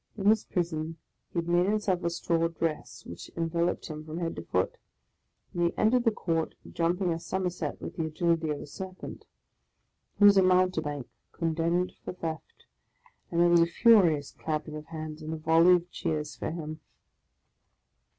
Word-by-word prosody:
In 195 - -4
his 220 -1 +1
prison 165 -2 -2 0.3
he - - -6
had 170 0 0
made 175 +1 +3
himself 205 -3 0
a 170 - +1
straw 165 -1 0
dress, 165 -2 -4
which 85 - -9
enveloped 170 +1 0
him 155 -1 -6
from 155 +1 -7
head 170 -1 -2
to - - -5
foot; - - -1 0.7
and 175 - -2
he 170 0 +1
entered 240 +3 +3
the 230 - +5
court, 165 -6 -2 0.2
jumping 175 +1 +1
a 165 - -4
somerset 180 -4 -3
with - - -7
the 165 - 0
agility 165 0 0
of 150 -1 -2
a - - -7
serpent. 185 +5 -8 0.9
He - - +2
was 200 -1 +8
a - - +7
mountebank 180 -7 +2 0.3
condemned 170 +2 0
for - - -5
theft, 165 -3 -6 0.6
and 170 - +1
there 175 - +6
was 170 -1 +6
a 165 - +4
furious 170 - +4
clapping 155 -1 -4
of 150 0 -8
hands, 155 -1 -6
and 155 +1 -4
a - - -5
volley 165 +3 +5
of 175 0 -3
cheers, 150 -1 -3
for - - -4
him. 155 -1 -5
170 Hz, 175 wpm, -29 LUFS, 160-180 Hz, 0.9 s, was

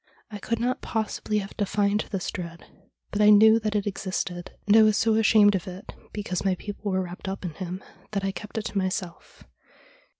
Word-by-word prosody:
I 205 - -6
could 230 +4 -2
not 250 +2 -1
possibly 220 -1 -2
have 200 -1 -4
defined 205 0 +1
this 190 -3 -3
dread, 170 -1 -7 0.5
but 205 - 0
I 210 - +7
knew 220 +2 +7
that 215 -1 -2
it 205 - 0
existed, 185 -3 -3 0.2
and 205 +1 +5
I 225 - +9
was 215 -1 +4
so 225 0 +3
ashamed 215 -1 +5
of 190 -2 -2
it, 185 +2 -8 0.2
because 190 -4 -3
my 190 -2 +2
people 205 +2 -5
were 190 0 +1
wrapped 180 +2 -8
up 190 -1 -5
in 170 - -4
him, 185 +2 -6 0.3
that 200 -1 -1
I 195 - 0
kept 210 +3 -8
it 220 - -2
to - - -4
myself. 185 -2 -4
205 Hz, 205 wpm, -26 LUFS, 185-215 Hz, 0.5 s, I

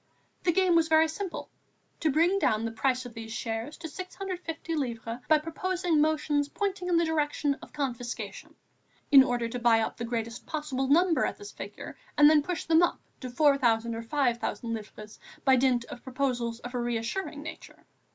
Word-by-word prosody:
The 350 - +2
game 370 0 +3
was 330 -1 +4
very 320 0 +5
simple, 355 +3 -5 0.5
to 315 - +1
bring 335 +7 +3
down 220 - +1
the 230 - -2
price 255 +3 0
of 245 - -9
these 225 0 -8
shares 225 +5 -4
to 335 - -6
650 365 -1 -6
livres 235 -5 -3
by 310 - +6
proposing 335 +1 0
motions 300 -2 +1
pointing 390 0 -2
in 350 -2 +3
the 335 - +3
direction 295 -2 0
of - - -12
confiscation, 240 -7 -5 0.6
in 275 -2 +10
order 245 -2 -1
to 245 +2 -5
buy 235 -1 +4
up 220 - -2
the 235 - -4
greatest 230 0 -4
possible 295 -4 -2
number 330 +4 +4
at - - -1
this 410 0 -9
figure - - -8 0.2
and 295 - +8
then 305 -1 +5
push 345 +3 -3
them 325 +1 +4
up 350 - +2 0.2
to 255 - -6
4,000 245 -5 +3
or 225 - -4
5,000 235 -2 -1
livres 215 -1 -8 0.3
by 265 -1 +6
dint 250 -2 +2
of 240 - -9
proposals 250 -3 -2
of 245 +1 -8
a 250 - -1
reassuring 240 +7 -3
nature. 310 - -10
275 Hz, 180 wpm, -28 LUFS, 235-320 Hz, 0.6 s, in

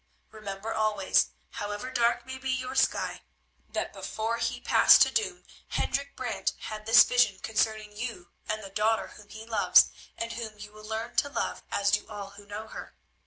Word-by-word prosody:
Remember 215 0 -6
always, 215 -3 +2 0.2
however 205 +5 -5
dark 240 -1 +1
may 260 0 -7
be 265 0 -4
your 255 0 -2
sky, - - +1 0.5
that - - -3
before 225 +1 -3
he - - -2
passed - - +7
to - - 0
doom 440 -1 -1 0.2
Hendrik 280 0 -2
Brant 245 -3 -2
had 215 0 -7
this 225 +2 +9
vision 245 -6 +3
concerning 215 0 -1
you 210 -6 -6 0.2
and 215 0 -2
the 195 - -9
daughter 220 +2 +1
whom 205 -1 -15
he 220 +1 -9
loves, 220 -3 +5 0.3
and 230 0 -3
whom 220 -2 -6
you 210 0 -10
will 215 0 -13
learn 225 +2 -4
to 285 - +3
love - - -3
as 200 0 +1
do 210 +1 +1
all 200 -2 -7
who 200 0 -14
know 210 +2 -6
her. - - -9
220 Hz, 180 wpm, -28 LUFS, 210-235 Hz, 0.5 s, this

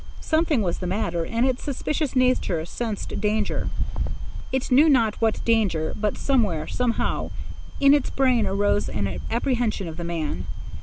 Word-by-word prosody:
Something 315 -7 +1
was 175 -3 -1
the 180 - -3
matter, 175 -3 -1
and 230 +2 +1
its 255 -1 0
suspicious 290 +1 -2
nature 255 -10 +2
sensed 220 +3 -4
danger,—it 215 +4 -3
knew 290 +5 +6
not 230 -6 +4
what 225 -1 +1
danger 200 -9 +1
but 210 -1 -1
somewhere, 215 - +1
somehow, 245 -2 -1 0.5
in 280 0 +6
its 290 -3 +2
brain 255 -4 +2
arose 205 +1 +1
an 100 -3 -2
apprehension 235 -5 0
of 160 0 -7
the 175 - -5
man. 170 -2 -3
225 Hz, 145 wpm, -24 LUFS, 180-255 Hz, 0.5 s, knew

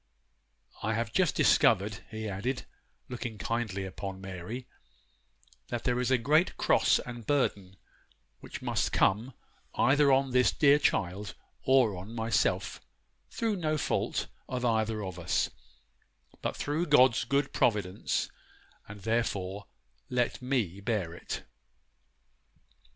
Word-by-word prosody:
I 110 +1 0
have 115 -1 -2
just 180 -5 +2
discovered,' 105 -1 +3
he 110 0 -5
added, 110 +7 -3 0.4
looking 120 -3 -5
kindly 105 -4 -2
upon 95 0 -6
Mary, 95 +6 -6 1.0
'that 120 -1 -4
there 125 0 +1
is 125 - 0
a 130 - +4
great 150 +9 +2
cross - - +4
and 120 -3 -7
burden 100 -9 0 0.6
which - - -9
must - - 0
come, 115 +7 +2 0.4
either 140 +1 +4
on 135 0 +3
this 125 0 +4
dear 145 0 +5
child 100 -4 -1 0.3
or 130 -6 +4
on 95 +6 -8
myself, 115 -2 0 0.5
through 225 -3 -1
no 155 -3 0
fault - - -1 0.2
of 125 -1 -2
either 110 -2 +1
of 95 -2 -6
us, 85 - 0 0.9
but - - -3
through 155 +4 -1
God's 130 -4 +5
good 140 +3 0
providence; 105 -4 0 0.6
and, 105 0 -10
therefore, 100 -3 -1 0.4
let 125 0 0
me 120 -8 -1
bear 100 -6 -1
it. 85 - -6
115 Hz, 125 wpm, -30 LUFS, 100-130 Hz, 1.0 s, dear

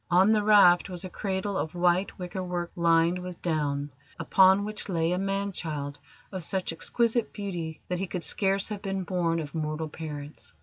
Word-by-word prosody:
On 185 +4 +5
the 215 -1 +3
raft 200 -4 +6
was 180 0 -1
a 185 - -7
cradle 195 +1 -2
of 160 -2 -3
white 175 +2 +1
wicker 180 +1 -5
work 175 -1 -3
lined 170 +1 +3
with 180 -1 -7
down, 145 -3 -1 0.3
upon 190 +1 +4
which 215 0 -5
lay 165 -2 +1
a 180 - 0
man 195 +1 -1
child 145 -5 -4 0.3
of 185 -3 -5
such 185 0 -1
exquisite 235 +6 0
beauty 175 -6 -5
that 180 -1 -2
he 195 - -2
could 175 -1 -3
scarce 195 +2 +1
have 210 -2 -5
been 195 -1 -2
born 170 -2 0
of 150 -3 -6
mortal 155 0 -3
parents. 150 -2 -8
180 Hz, 185 wpm, -27 LUFS, 165-195 Hz, 0.3 s, raft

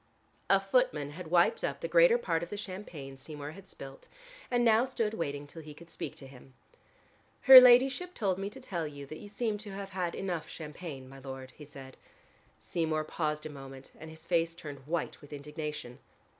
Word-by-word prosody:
A - - +6
footman - - +1
had 165 +1 -8
wiped 170 0 +3
up - - -2
the - - -2
greater - - +6
part 320 - -1
of 170 - -5
the 205 - -5
champagne 180 -9 -7
Seymour 145 +1 -8
had 195 +4 -13
spilt 135 -6 -11 0.4
and 245 -1 +2
now 225 0 +5
stood 235 -5 -1
waiting 145 -6 -3
till 165 +3 -10
he 150 -1 -11
could 170 +2 -14
speak - - -6
to 135 - -10
him. 130 0 -15 0.9
"Her 265 -1 +12
ladyship 265 +8 +5
told 195 -4 0
me 195 +1 -3
to - - -11
tell 170 -4 -3
you 145 -1 -9
that 155 +3 -9
you 205 - -10
seemed 215 -1 -2
to 205 -2 -8
have 195 0 -6
had 180 -2 -2
enough 175 -4 -3
champagne, 150 -4 -8
my 135 +1 -12
lord," 130 -1 -8
he 150 - -12
said. 135 -2 -12 0.6
Seymour 160 -2 -1
paused 150 -1 -2
for 155 - -5
a - - -9
moment, 135 -1 -11
and 160 - -9
his 160 +1 -12
face 165 -1 +1
turned 145 -5 -9
white 170 +1 -2
with 145 - -15
indignation. 150 -3 -6
160 Hz, 200 wpm, -31 LUFS, 145-200 Hz, 0.9 s, Her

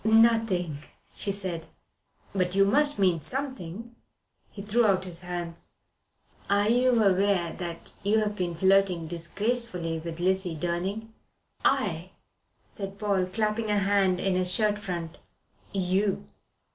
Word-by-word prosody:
"Nothing," 220 -8 +3 0.4
she 200 - 0
said. 185 -5 -4 0.7
"But 185 -1 0
you 195 0 +5
must 290 +8 +3
mean 180 -5 +2
something." 235 - -3 0.5
He 200 - -9
threw 220 +4 +2
out 190 -2 +2
his 175 -1 -3
hands. 175 -2 -5 0.7
"Are 200 +1 +3
you 245 0 +3
aware 190 -3 +2
that 170 -2 -5
you've 210 +1 +1
been 175 -3 -2
flirting 190 -1 +3
disgracefully 175 +1 -1
with 165 -1 -6
Lizzle 185 -1 0
Durning?" 185 +7 -3 0.5
"I?" - - 0 0.5
said 195 -2 -6
Paul, 200 -3 0
clapping 215 +3 -1
a 210 - +2
hand 195 -2 +2
to - - -4
his 185 -1 +2
shirt 210 0 +2
front. 170 -5 -5 0.5
"You." 195 +1 0
195 Hz, 125 wpm, -27 LUFS, 180-210 Hz, 0.7 s, you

